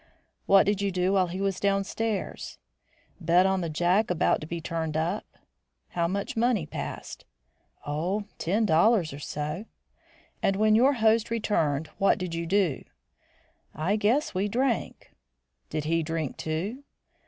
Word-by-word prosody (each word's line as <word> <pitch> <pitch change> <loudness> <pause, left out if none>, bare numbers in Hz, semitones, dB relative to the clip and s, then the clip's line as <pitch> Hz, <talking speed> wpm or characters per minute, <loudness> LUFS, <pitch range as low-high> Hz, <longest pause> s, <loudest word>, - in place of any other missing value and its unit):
"What 195 0 +6
did 200 0 +1
you 200 - +1
do 180 +1 +1
while 190 -2 +3
he 180 +2 -5
was 195 -1 -1
downstairs?" 200 +2 -2 0.6
"Bet 175 +1 +4
on 190 -1 +1
the 170 - -2
Jack 175 +7 +2
about 180 -1 +2
to 155 - -7
be 170 +1 -4
turned 160 -1 -3
up." 170 +6 -1 0.6
"How 170 -1 0
much 200 +9 -3
money 230 -6 +2
passed?" - - -6 0.6
"Oh, 170 +8 -1 0.2
ten 205 +7 +1
dollars 170 -1 +3
or 140 - -8
so." 150 +7 -4 0.8
"And 195 - +2
when 215 +1 +3
your 255 +6 +5
host 225 -2 +2
returned, 160 -10 0
what 195 - +4
did 180 -2 -4
you 165 0 -3
do?" 185 -6 +1 0.9
"I 175 +7 0
guess 225 +8 +1
we 195 +2 0
drank." 245 +2 -1 0.6
"Did 155 -1 -2
he 165 +2 +1
drink 160 -3 -3
too?" 190 - -4
190 Hz, 150 wpm, -27 LUFS, 165-210 Hz, 0.9 s, What